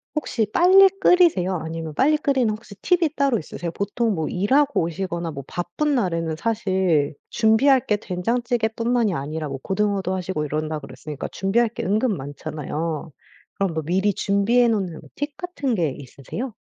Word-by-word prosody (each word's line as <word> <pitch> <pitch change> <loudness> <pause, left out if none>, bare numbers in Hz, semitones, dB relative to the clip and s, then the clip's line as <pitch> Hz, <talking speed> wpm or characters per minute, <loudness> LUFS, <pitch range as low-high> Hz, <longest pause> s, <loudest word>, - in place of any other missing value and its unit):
혹시 250 -7 0
빨리 380 - +7
끓이세요? 310 - +4
아니면 160 -1 -5
빨리 300 - +3
끓이는 270 -6 +1
혹시 215 -1 -10
팁이 345 -4 +2
따로 275 -5 +2
있으세요? 170 +2 -6
보통 210 +5 -1
뭐 160 -4 -2
일하고 270 +10 +2
오시거나 170 0 -3
뭐 140 -2 -7
바쁜 175 +13 -1
날에는 165 -8 0
사실 185 -7 0
준비할 240 +4 +4
게 210 - +2
된장찌개뿐만이 230 +3 0
아니라 155 +1 -4
뭐 135 -1 -5
고등어도 195 -2 0
하시고 185 -4 -2
이런다 155 +1 -2
그랬으니까 140 +1 -7
준비할 220 +5 +1
게 225 - -6
은근 210 +1 +1
많잖아요. 150 +3 -5 0.4
그럼 195 -4 -1
뭐 160 - -2
미리 190 +5 +1
준비해 205 +6 +2
놓는 195 -8 -1
뭐 - - -16
팁 290 0 -4
같은 290 -9 -2
게 170 -6 +1
있으세요? 140 - -7
195 Hz, 370 characters per minute, -23 LUFS, 165-240 Hz, 0.4 s, 빨리